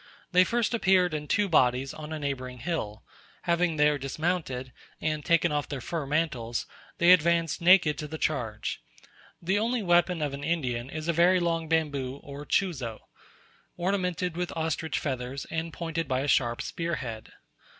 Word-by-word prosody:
They 180 0 +6
first 235 +5 0
appeared 190 -6 +3
in 150 -1 -3
two 205 +5 +2
bodies 130 -5 +2
on 155 0 -8
a 155 - -3
neighbouring 130 -3 -4
hill; 115 -7 -4 0.4
having 170 -1 +1
there 150 -1 +3
dismounted, 135 -3 -2 0.3
and 155 -1 -1
taken 170 0 +3
off 145 -1 -1
their 140 - -4
fur 155 +3 -4
mantles, 135 -7 -1 0.3
they 170 +1 +6
advanced 170 -1 +3
naked 175 -3 +5
to 150 - -4
the 160 +1 -6
charge. 120 -10 -2 0.6
The 190 +4 +2
only 230 +1 0
weapon 175 -2 +3
of 145 -2 -2
an 140 +1 -6
Indian 130 -7 -1
is 155 +2 -5
a 170 - +2
very 175 +3 +5
long 165 -2 0
bamboo 145 -5 0
or 140 +1 -9
chuzo, 135 - -1 0.8
ornamented 180 -2 -1
with 180 0 -2
ostrich 160 -1 -1
feathers, 130 0 -3
and 165 0 -2
pointed 165 -1 -3
by 130 0 0
a 140 - -2
sharp 120 -4 +2
spearhead. 135 -10 -4
160 Hz, 160 wpm, -28 LUFS, 135-175 Hz, 0.8 s, They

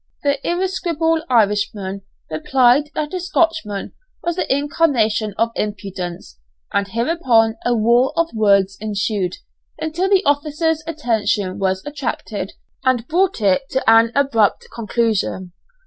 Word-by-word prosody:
The 285 -1 +1
irascible 340 -3 0
Irishman 205 -3 +1 0.3
replied 255 - +3
that 305 +1 -3
a 370 - -1
Scotchman 330 - -1 0.3
was 345 -1 -1
the 365 - -2
incarnation 255 - +1
of 230 0 +1
impudence 180 - -5 0.3
and 200 0 +1
hereupon 230 - +2
a 245 - +1
war 235 +4 +3
of 335 -3 +1
words 200 -3 +3
ensued, 205 -3 -2 0.4
until 335 +5 -1
the 395 -1 +3
officers' 305 +2 +1
attention 220 - -1
was 190 -1 -1
attracted 235 -8 -4 0.3
and 255 -3 +1
brought 360 -3 +1
it 205 +7 +2
to 265 - -2
an 225 0 +6
abrupt 235 -7 +2
conclusion. 220 -5 -1
235 Hz, 120 wpm, -19 LUFS, 205-305 Hz, 0.4 s, an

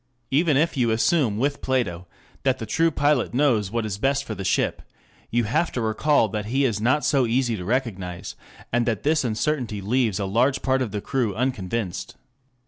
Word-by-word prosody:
Even 150 +1 +3
if 165 +4 +1
you 125 -4 +2
assume 115 0 +2
with 140 +4 -1
Plato 90 -10 -1 0.3
that 130 -1 +1
the 115 - -5
true 165 +10 +2
pilot 145 -5 +1
knows 120 -8 +2
what 115 +1 -2
is 100 -2 -4
best 140 +3 +1
for 115 - -5
the 100 - -6
ship, - - 0 0.5
you 120 +1 +1
have 120 +11 0
to - - -2
recall 115 +3 +2
that 105 +1 -4
he 135 +4 +1
is 110 -5 0
not 130 +6 +2
so 135 -4 +3
easy 120 0 +1
to 90 - -6
recognize, 95 -6 -3 0.4
and 120 0 +2
that 115 -4 -1
this 155 0 +2
uncertainty 120 -1 -1
leaves 110 0 0
a 100 - -1
large 125 +7 +1
part 130 0 +2
of 125 - -1
the 105 0 -4
crew 120 -7 -1
unconvinced. 110 - -3
120 Hz, 195 wpm, -24 LUFS, 105-135 Hz, 0.5 s, Even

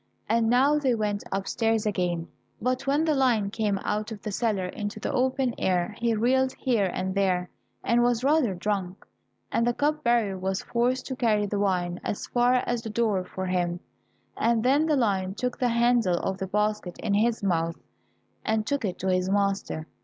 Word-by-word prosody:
And 225 0 +2
now 275 +5 +4
they 260 -4 +2
went 210 -2 -1
upstairs 220 +3 0
again, 175 -4 -1 0.3
but 255 +3 -1
when 290 +3 +2
the 315 - +2
lion 240 -7 +2
came 210 -2 0
out 215 +2 -2
of 210 -2 -8
the 210 - -3
cellar 205 -3 0
into 205 +3 -5
the - - -3
open 260 -1 +1
air, 180 +2 0
he 235 -1 +1
reeled 260 +4 +2
here 225 -8 +1
and 190 +1 -2
there, 185 -2 0 0.3
and 235 +1 +3
was 240 0 +2
rather 275 -8 +3
drunk, 190 -1 -3 0.5
and 230 - +1
the 240 - +1
cup 300 +1 0
bearer 230 -5 +1
was 190 +1 -2
forced 250 +2 0
to 260 - -4
carry 215 -4 +2
the 205 0 -2
wine 180 -3 0
as 205 - -3
far 245 +1 +2
as 240 -1 -1
the 225 - -6
door 215 -4 +1
for 190 +1 -5
him, 175 -1 -1 0.6
and 230 -1 +1
then 280 +5 +3
the 305 - +3
lion 195 -6 0
took 250 +2 -3
the 250 - +2
handle 235 -6 +3
of 190 +1 -3
the 190 - -3
basket 210 -2 -1
in 215 -2 -2
his 225 +1 +1
mouth, 165 -3 0 0.7
and 220 -1 0
took 285 0 -1
it 185 -4 -2
to 190 - -4
his 185 0 +1
master. 195 -5 0
215 Hz, 190 wpm, -26 LUFS, 190-245 Hz, 0.7 s, now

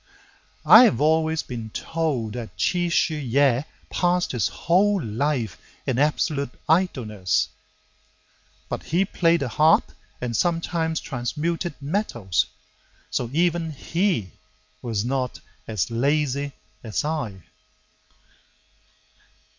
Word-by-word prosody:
I 250 - +10
have 120 - +2
always 160 +1 +2
been 115 -3 -6
told 135 -5 -2
that 115 -7 -7
Chi 175 - +1
Shu 170 -1 +2
yeh 135 -3 +2 0.3
Passed 180 0 +1
his 120 -7 +1
whole 195 +4 +2
life 120 - -2 0.3
in 130 -1 0
absolute 145 -1 +1 0.2
idleness. 110 - +1 1.2
But - - -4
he 180 +5 +2
played 170 -3 +2
the 135 - 0
harp 155 +7 +3 0.3
and 120 -2 -3
sometimes 165 +1 0
transmuted 155 +6 -3
metals, 140 - -1 0.6
So 120 - -1
even 165 +1 +1
he 165 - -1 0.5
was 115 -3 -2
not 130 -1 -2 0.3
so 110 0 -2
lazy 140 +2 0 0.3
as 110 +4 -2
I. 120 - -3
145 Hz, 105 wpm, -24 LUFS, 115-165 Hz, 1.2 s, I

